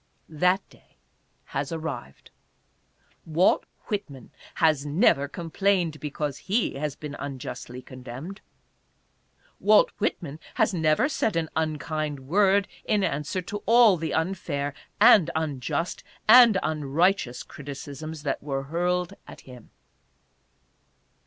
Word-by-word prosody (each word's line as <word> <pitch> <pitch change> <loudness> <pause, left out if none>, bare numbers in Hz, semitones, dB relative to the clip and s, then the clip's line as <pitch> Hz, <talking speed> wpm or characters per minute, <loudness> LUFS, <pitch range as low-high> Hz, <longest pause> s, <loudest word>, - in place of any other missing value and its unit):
That 180 +5 +1
day - - -24 0.5
has 140 +2 -4
arrived. 155 - -6 0.9
Walt 165 +4 +2 0.2
Whit 205 -6 -3
man 135 -3 -13 0.2
has 155 -4 +3
never 145 - +3
complained 170 0 0
because 150 -1 -4
he 215 +3 +1
has 145 0 -3
been 150 -2 -7
unjustly 125 -2 -7
con 130 -1 -11
demned. 135 - -8 1.2
Walt - - +5
Whitman 155 -3 -2 0.2
has - - +2
never 160 - +2
said 225 - -1
an 165 -1 -1
unkind 155 -2 -2
word 195 +7 +3 0.2
in 210 -2 +1
answer 150 +4 -2
to 205 +4 -6
all 230 -3 +7
the 165 -1 -3
unfair, 160 -5 -2 0.3
and 175 -6 +7
unjust, 155 +1 -2 0.2
and 230 -2 +8
unrighteous 155 -1 0
criticisms 145 +2 -8
that 140 - -2
were 135 -2 -3
hurled 175 +4 -1
at - - -11
him. 125 -3 -14
155 Hz, 115 wpm, -26 LUFS, 140-185 Hz, 1.2 s, and